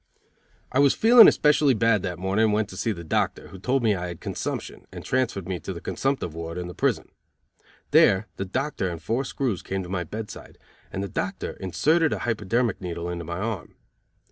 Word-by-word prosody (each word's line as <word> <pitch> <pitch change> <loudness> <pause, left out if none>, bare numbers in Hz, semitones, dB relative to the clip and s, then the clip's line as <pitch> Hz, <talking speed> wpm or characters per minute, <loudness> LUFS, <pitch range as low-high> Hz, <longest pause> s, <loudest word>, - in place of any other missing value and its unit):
I 130 - +1
was 140 -1 +5
feeling 230 +1 +8
especially 150 -3 +4
bad 110 -1 +3
that 90 -2 -4
morning 95 +4 +1
and 105 - +2
went 105 -1 0
to - - -9
see 115 - -1
the 85 -5 -6
doctor, 80 - -1
who 95 - -11
told 125 +6 0
me 110 -2 +4
I 90 -2 -3
had 85 -2 -7
consumption, - - -5
and - - -9
transferred 120 -8 -1
me 95 -2 -3
to - - -6
the - - -7
consumptive 135 - -2
ward 85 +1 -6
in 90 -1 -4
the 90 - -7
prison. - - 0 0.8
There 95 +3 +5
the 95 - -3
doctor 130 -1 -2
and 85 -2 -5
four 115 - -1
screws 125 -7 -2
came 95 0 -3
to 90 - -9
my 90 -2 -2
bedside, 105 +5 -8 0.3
and 95 - -3
the - - -3
doctor - - -3
inserted 155 - +1
a - - -3
hyperdermic 115 +1 0
needle 85 -1 -4
into 85 -1 -5
my 85 +1 -4
arm. 105 -1 -4
100 Hz, 205 wpm, -25 LUFS, 90-125 Hz, 0.8 s, feeling